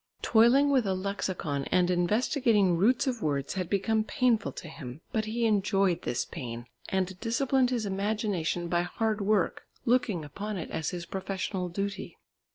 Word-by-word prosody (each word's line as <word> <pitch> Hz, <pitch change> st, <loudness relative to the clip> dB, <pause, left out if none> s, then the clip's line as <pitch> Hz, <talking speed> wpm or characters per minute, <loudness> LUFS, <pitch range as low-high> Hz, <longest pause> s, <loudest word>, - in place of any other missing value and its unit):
Toiling 245 Hz, +6 st, +5 dB
with 255 Hz, -6 st, +3 dB
a 190 Hz, -, +1 dB
lexicon 185 Hz, -7 st, -2 dB
and 180 Hz, 0 st, +2 dB
investigating 210 Hz, -, +2 dB
roots 215 Hz, +9 st, +3 dB
of 250 Hz, -4 st, -2 dB
words 140 Hz, -4 st, -1 dB
had 185 Hz, -3 st, -3 dB
become 215 Hz, +2 st, +1 dB
painful 235 Hz, -2 st, +1 dB
to -, -, -8 dB
him, 145 Hz, -3 st, -9 dB
but 220 Hz, -1 st, 0 dB
he 230 Hz, +2 st, -1 dB
enjoyed 195 Hz, -4 st, +2 dB
this 120 Hz, 0 st, -1 dB
pain, 120 Hz, -6 st, -6 dB, 0.2 s
and 190 Hz, -1 st, -1 dB
disciplined 250 Hz, +2 st, +1 dB
his 240 Hz, -4 st, -1 dB
imagination 195 Hz, -4 st, -1 dB
by 175 Hz, 0 st, +1 dB
hard 215 Hz, +4 st, -1 dB
work, 200 Hz, -2 st, +1 dB, 0.2 s
looking 225 Hz, -9 st, +1 dB
upon 205 Hz, +8 st, -5 dB
it 165 Hz, -, -6 dB
as 160 Hz, -, -2 dB
his 175 Hz, -1 st, -5 dB
professional 190 Hz, -1 st, -3 dB
duty. 195 Hz, +3 st, -4 dB
195 Hz, 160 wpm, -29 LUFS, 175-220 Hz, 0.2 s, Toiling